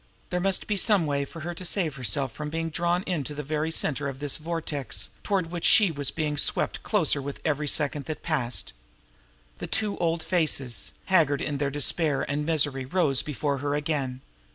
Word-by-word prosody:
There 180 Hz, -, 0 dB
must 195 Hz, +1 st, +2 dB
be 210 Hz, -, -1 dB
some 195 Hz, -3 st, +4 dB
way 140 Hz, -1 st, 0 dB
to 165 Hz, +4 st, -6 dB
save 170 Hz, -4 st, 0 dB
herself 130 Hz, +1 st, 0 dB
from 150 Hz, +7 st, -5 dB
being 165 Hz, +1 st, -3 dB
drawn 175 Hz, +3 st, 0 dB
into 150 Hz, -6 st, -3 dB
the 150 Hz, -, -4 dB
very 155 Hz, +2 st, -1 dB
center 150 Hz, -3 st, 0 dB
of 135 Hz, -, -7 dB
this 145 Hz, 0 st, 0 dB
vortex 150 Hz, -, -3 dB
toward 185 Hz, -5 st, -1 dB
which 175 Hz, -2 st, -4 dB
she 205 Hz, -5 st, +6 dB
was 145 Hz, -3 st, -1 dB
being 150 Hz, -2 st, -2 dB
swept -, -, +2 dB
closer 165 Hz, -9 st, +1 dB
with 140 Hz, +1 st, -6 dB
every 150 Hz, -1 st, 0 dB
second 145 Hz, 0 st, +1 dB
that 155 Hz, -, -5 dB
passed. 130 Hz, -7 st, -1 dB, 0.9 s
Those -, -, -5 dB
two 210 Hz, -2 st, 0 dB
old 165 Hz, -1 st, 0 dB
faces, 150 Hz, -8 st, 0 dB
haggard 155 Hz, -7 st, +3 dB
in 145 Hz, -2 st, -2 dB
their 140 Hz, -1 st, +1 dB
despair 145 Hz, +1 st, +1 dB
and 150 Hz, +1 st, -2 dB
misery, 145 Hz, -4 st, +1 dB
rose 140 Hz, -3 st, +2 dB
before 145 Hz, -1 st, -2 dB
her 145 Hz, +1 st, -1 dB
again. 145 Hz, -4 st, -2 dB
150 Hz, 180 wpm, -27 LUFS, 140-170 Hz, 0.9 s, she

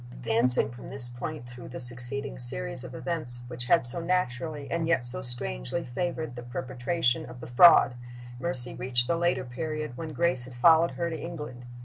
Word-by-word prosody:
Advancing 125 Hz, -1 st, +3 dB
from 120 Hz, -, -11 dB
this 135 Hz, -2 st, -6 dB
point 120 Hz, +2 st, -7 dB
through 120 Hz, -1 st, -11 dB
the -, -, -8 dB
succeeding 125 Hz, -, -3 dB
series -, -, -4 dB
of -, -, -9 dB
events 140 Hz, -8 st, -1 dB
which 120 Hz, 0 st, -2 dB
had 165 Hz, +2 st, +4 dB
so 120 Hz, +8 st, +5 dB
naturally 160 Hz, -4 st, -2 dB
and 170 Hz, -1 st, -1 dB
yet 150 Hz, -7 st, +2 dB
so 120 Hz, +1 st, +3 dB
strangely 65 Hz, -, -4 dB
favored 155 Hz, +1 st, -4 dB
the 120 Hz, -, -7 dB
perpetration 125 Hz, +3 st, -1 dB
of 125 Hz, 0 st, -10 dB
the -, -, -8 dB
fraud, 135 Hz, +2 st, +7 dB, 0.5 s
Mercy 130 Hz, -5 st, +1 dB
reached 120 Hz, 0 st, +2 dB
the 170 Hz, -, 0 dB
later 175 Hz, +1 st, 0 dB
period 155 Hz, +2 st, -5 dB
when 160 Hz, +2 st, -5 dB
Grace 160 Hz, -6 st, 0 dB
had 130 Hz, -1 st, -12 dB
followed 165 Hz, +6 st, +5 dB
her 170 Hz, -1 st, -2 dB
to 160 Hz, -, -5 dB
England. 150 Hz, -8 st, -7 dB
125 Hz, 180 wpm, -27 LUFS, 120-160 Hz, 0.5 s, fraud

